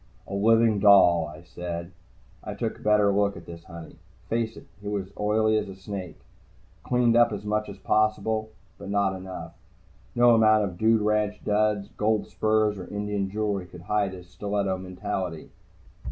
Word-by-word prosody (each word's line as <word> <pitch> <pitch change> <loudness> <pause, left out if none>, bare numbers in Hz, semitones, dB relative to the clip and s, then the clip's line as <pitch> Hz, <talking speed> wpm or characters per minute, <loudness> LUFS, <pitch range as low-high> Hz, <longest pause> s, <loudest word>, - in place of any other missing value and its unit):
"A - - -9
living 110 +1 +3
doll," 90 -5 +6
I 80 +2 -12
said. 85 0 -6 0.5
I - - -6
took - - -3
a - - -17
better 105 -1 +3
look 100 0 +1
at - - -11
this 85 -1 -11
honey. 85 -2 -11 0.3
Face 115 -1 -1
it, - - -12 0.2
he 100 - -8
was 100 -2 -2
an 95 - -20
oily 110 -1 +1
snake, 95 -2 -7 0.7
cleaned 120 -2 +2
up 120 0 +5
as 105 -1 -5
much 105 0 -1
as 100 - -9
possible, 110 0 0 0.3
but - - -8
not 100 -1 +1
enough. 95 0 -8 0.6
No 120 0 +6
amount 110 -1 +5
of 90 -3 -5
dude 110 0 +3
ranch 105 -1 0
duds, 105 -1 +1
gold 110 0 +1
spurs 110 -2 +1
or 90 - -8
Indian 105 -1 -3
jewelry 100 -3 -2
could 90 -1 -12
hide 100 +1 0
his 90 -1 -11
stiletto 100 0 -2
mentality. 95 -2 -5
105 Hz, 170 wpm, -26 LUFS, 95-110 Hz, 0.7 s, doll